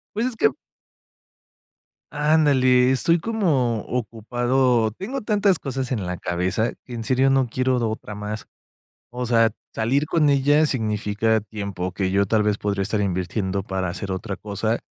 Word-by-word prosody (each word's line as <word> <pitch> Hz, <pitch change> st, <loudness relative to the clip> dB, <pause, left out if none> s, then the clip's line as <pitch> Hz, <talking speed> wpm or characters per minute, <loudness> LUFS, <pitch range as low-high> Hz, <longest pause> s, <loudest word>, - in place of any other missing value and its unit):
Pues, 225 Hz, +3 st, 0 dB
es 255 Hz, -3 st, -3 dB
que 145 Hz, -, +4 dB, 1.6 s
Ándale, 140 Hz, -4 st, +4 dB
estoy 165 Hz, +6 st, +3 dB
como 155 Hz, -, +1 dB
ocupado, 120 Hz, +1 st, 0 dB
o 110 Hz, -, +1 dB
tengo 230 Hz, -, -5 dB
tantas 205 Hz, -5 st, +2 dB
cosas 130 Hz, -1 st, -4 dB
en 105 Hz, -7 st, -2 dB
la 90 Hz, -, -3 dB
cabeza 90 Hz, +7 st, -1 dB
que, 125 Hz, -, -8 dB
en 115 Hz, -1 st, -5 dB
serio, 130 Hz, +3 st, +3 dB
no 135 Hz, -2 st, +2 dB
quiero 130 Hz, +2 st, 0 dB
otra 110 Hz, -1 st, -6 dB
más. 105 Hz, +1 st, -6 dB, 0.7 s
O 125 Hz, 0 st, -3 dB
sea, 115 Hz, -1 st, +3 dB, 0.2 s
salir 135 Hz, +7 st, 0 dB
con 155 Hz, -2 st, +2 dB
ella 145 Hz, +2 st, +4 dB
significa 110 Hz, -3 st, 0 dB
tiempo, 100 Hz, -4 st, -5 dB
que 95 Hz, +1 st, -1 dB
yo, 100 Hz, +1 st, +2 dB
tal 110 Hz, +2 st, +2 dB
vez, 105 Hz, 0 st, 0 dB
podría 100 Hz, -1 st, -1 dB
estar 105 Hz, +2 st, -1 dB
invirtiendo 95 Hz, +1 st, -1 dB
para 95 Hz, -1 st, -3 dB
hacer 95 Hz, +3 st, -5 dB
otra 95 Hz, +2 st, -3 dB
cosa 110 Hz, +2 st, -2 dB
115 Hz, 155 wpm, -23 LUFS, 105-135 Hz, 1.6 s, que